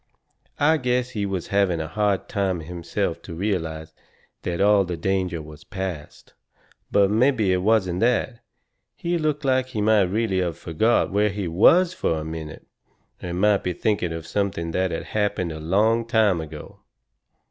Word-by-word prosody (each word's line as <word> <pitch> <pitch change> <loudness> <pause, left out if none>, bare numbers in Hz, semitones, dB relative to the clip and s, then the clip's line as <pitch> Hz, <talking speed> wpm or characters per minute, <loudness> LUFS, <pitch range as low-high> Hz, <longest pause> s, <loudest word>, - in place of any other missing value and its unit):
I 155 +2 +4
guess 125 -2 0
he 105 -4 -2
was 95 -3 -4
having 100 -4 +2
a 80 - -3
hard 100 +2 0
time 95 -4 -1
himself 85 +2 -3
to 85 - -9
realize 80 -5 -3 0.5
that 85 -1 -3
all 100 0 +5
the 90 -2 -4
danger 90 -2 -1
was 75 0 -12
past. 95 -6 -7 0.6
But 100 -1 +3
mebby 110 -4 +3
it - - +2
wasn't 95 -4 +2
that 120 +1 +1 0.6
he 170 0 -2
looked 150 -2 -1
like 130 -1 +2
he 110 -5 -4
might 105 -2 +4
really 105 -1 0
of 85 -3 -2
forgot 110 +10 +1
where 105 +2 +2
he 100 -2 -4
was 170 - +5
fur 80 - -1
a - - -7
minute, 80 -1 -7 0.6
and 90 0 -4
might 105 0 +3
be 90 - -1
thinking 90 -1 -1
of 80 -1 -6
something 90 -4 -2
that 95 +2 0
had 80 - -4
happened 105 -5 -1
a 80 - -6
long 110 +8 +1
time 110 -7 +3
ago. 75 -1 -10
95 Hz, 170 wpm, -23 LUFS, 85-110 Hz, 0.6 s, all